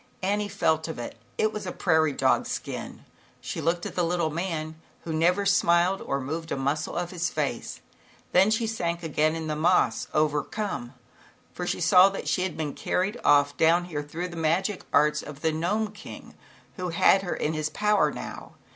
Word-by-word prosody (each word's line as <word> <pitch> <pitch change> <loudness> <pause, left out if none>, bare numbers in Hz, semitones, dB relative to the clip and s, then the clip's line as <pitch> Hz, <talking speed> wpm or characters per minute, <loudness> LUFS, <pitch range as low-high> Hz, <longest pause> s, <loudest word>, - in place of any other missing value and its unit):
Annie 205 +2 0
felt 160 -5 +1
of 160 - -5
it. 120 - -6 0.2
It 215 0 +1
was 210 -3 -5
a - - -2
prairie 160 -5 +2
dog's - - +1
skin. - - -6 0.3
She - - -5
looked 170 +3 0
at - - -5
the 180 - 0
little 170 -2 0
man 160 -2 -4 0.2
who 165 - -4
never 180 +5 +2
smiled 180 -1 +3
or 140 - -2
moved 160 +5 -5
a - - +1
s - - -5
muscle 145 +3 -1
of 175 0 -2
his 175 -1 -1
face. - - -3 0.5
Then 190 +3 +5
she 220 +1 +1
sank 170 -6 -2
again 155 0 +1
on 165 -1 -4
the 155 -1 -2
moss, 155 -8 +2
overcome, 150 - -1 0.6
for - - -4
she - - -1
saw 185 +2 +7
that 195 - -6
she 185 - +1
had 185 -2 -2
been 150 -3 -3
carried 200 +6 -1
off 145 0 +4
down 170 +2 +4
here 155 -5 -4
through 165 +5 -5
the 170 - -9
magic 170 +5 0
arts 150 +1 +3
of 150 -1 -10
the 160 - +2
Gnome 205 +7 -1
King, 210 +1 -11 0.4
who 180 -1 -3
had 175 +3 +4
her 180 - -3
in 155 - -1
his 155 0 -1
power 210 +6 +2
now. - - -8
170 Hz, 195 wpm, -26 LUFS, 155-185 Hz, 0.6 s, saw